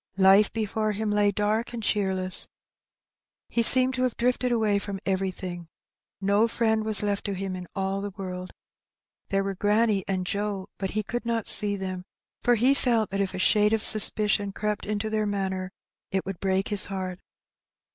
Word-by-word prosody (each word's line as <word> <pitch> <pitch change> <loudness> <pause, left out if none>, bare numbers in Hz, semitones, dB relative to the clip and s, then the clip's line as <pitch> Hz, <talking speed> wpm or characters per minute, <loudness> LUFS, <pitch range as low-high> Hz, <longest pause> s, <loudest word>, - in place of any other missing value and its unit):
Life 195 +2 +5
before 215 -1 -2
him 210 +1 -3
lay 205 0 +2
dark 210 +4 -2
and 230 -2 -6
cheerless. 190 -3 0 1.0
He 235 - 0
seemed 255 +2 +8
to 255 - -3
have 255 -2 -1
drifted 250 +1 0
away 215 -4 +1
from 200 -1 -6
every 190 0 -1
thing: 175 -2 -8 0.5
no 200 +3 +2
friend 220 -1 0
was 215 -1 +5
left 205 -1 -2
to 200 - -2
him 190 0 -4
in 180 -1 -8
all 195 0 -2
the 205 - -4
world. 185 -2 -7 0.8
There 195 0 0
were 195 0 -3
granny 210 +1 +1
and 185 -2 -2
Joe, 200 0 -4
but 195 - -3
he 215 - 0
could 240 +4 -5
not 230 -2 -2
see 205 -1 +3
them, 185 -2 -6 0.4
for 245 - +3
he 250 +5 +3
felt 235 -6 0
that 195 0 -1
if 195 -1 -3
a - - -4
shade 210 +3 +2
of 220 -1 0
suspicion 210 -1 +4
crept 210 0 -3
into 210 0 -2
their 215 -1 -1
manner, 190 -2 -3 0.4
it 190 -1 -2
would 195 -2 -6
break 190 0 -1
his 205 -2 +3
heart. 185 -2 -5
205 Hz, 185 wpm, -25 LUFS, 190-220 Hz, 1.0 s, seemed